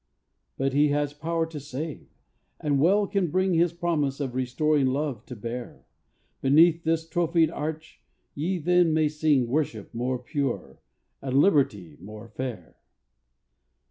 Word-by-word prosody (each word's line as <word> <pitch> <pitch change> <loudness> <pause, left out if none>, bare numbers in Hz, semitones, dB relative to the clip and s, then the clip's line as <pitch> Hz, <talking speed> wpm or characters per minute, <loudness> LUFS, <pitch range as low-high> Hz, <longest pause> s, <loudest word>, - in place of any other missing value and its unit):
But 135 0 0
he 145 +2 +4
has 145 0 0
power 165 +2 -1
to 160 -2 -7
save, 145 +2 -6 0.5
and 145 -2 0
well 195 +7 +4
can 195 -3 0
bring 185 +3 +1
His 170 0 +3
promise 160 -5 -1
of 135 -4 -3
restoring 130 +3 +1
love 135 -4 -2
to 125 - -7
bear: 120 +3 -7 0.6
Beneath 165 +5 +5
this 160 0 0
trophied 165 -1 +2
arch, 160 0 -6 0.3
ye 175 +6 -1
then 175 0 +3
may 155 -1 +3
sing 150 -3 +2
Worship 120 -6 -2
more 125 +2 -1
pure, 125 - -4 0.4
and 135 -1 -1
liberty 105 - +2
more 105 +5 -10
fair. 115 -6 -6
145 Hz, 140 wpm, -26 LUFS, 130-165 Hz, 0.6 s, Beneath